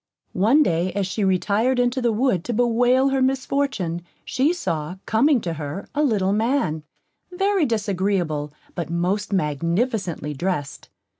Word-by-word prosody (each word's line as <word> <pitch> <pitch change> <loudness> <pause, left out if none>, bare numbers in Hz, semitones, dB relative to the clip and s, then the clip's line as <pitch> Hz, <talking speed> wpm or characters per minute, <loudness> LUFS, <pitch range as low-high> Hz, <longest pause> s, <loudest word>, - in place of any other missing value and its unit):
One 230 +11 +4
day, 175 - 0
as 200 0 0
she 195 +3 -2
retired 205 +6 +2
into 245 +1 +1
the 240 -1 +2
wood 220 -6 +1
to 240 - -2
bewail 245 +3 +3
her 270 -1 0
misfortune, 260 -9 0 0.2
she 270 +5 +1
saw, 165 - -3
coming 265 +5 +3
to 170 -4 -3
her, 150 +4 -6
a 295 - 0
little 200 -8 +2
man, 220 - 0 0.5
very 385 -3 +1
disagreeable, 190 -8 -1 0.2
but 170 - -4
most 185 +5 -1
magnificently 170 - -1
dressed. 145 -2 -3
205 Hz, 140 wpm, -23 LUFS, 170-255 Hz, 0.5 s, One